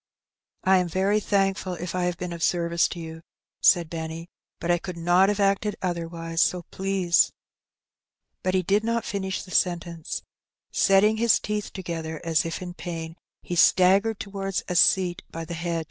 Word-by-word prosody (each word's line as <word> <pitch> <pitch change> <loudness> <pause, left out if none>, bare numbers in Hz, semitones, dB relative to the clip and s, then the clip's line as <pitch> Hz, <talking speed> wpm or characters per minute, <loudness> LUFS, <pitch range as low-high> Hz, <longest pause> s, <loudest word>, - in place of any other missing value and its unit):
" - - -55
I 190 - +6
am 180 - 0
very 195 +4 +1
thankful 195 -2 0
if 175 0 -5
I 180 -1 0
have 175 -1 -1
been 180 -1 -5
of 170 - -8
service 170 0 +2
to 175 - -7
you,'* 160 0 -8 0.4
said 175 -3 +5
Benny; 160 +1 -6 0.3
"but 170 - 0
I 175 - +2
could 180 0 -7
not 175 +3 +4
have 205 0 -1
acted 200 +1 +1
otherwise, 165 -2 -2
so 180 -1 +1
please 190 -2 +2 0.6
" - - -59
But 185 0 +1
he 185 - +2
did 200 +4 +2
not 230 0 -1
finish 190 -1 -3
the 185 - -13
sentence: 170 -3 -1 0.5
setting 205 +3 +4
his 230 0 +4
teeth 210 0 -3
toge 170 -3 -5
ther, 160 -1 -6
as 165 -1 +1
if 165 +2 -5
in 175 -1 -7
pain, 165 -2 -6 0.3
be - - -3
staggered 195 +5 +4
towards 195 -1 -3
a 180 - -3
seat 175 0 +3
by 165 0 -6
the 170 - -6
hedge. 170 0 -2
180 Hz, 185 wpm, -25 LUFS, 170-195 Hz, 0.6 s, I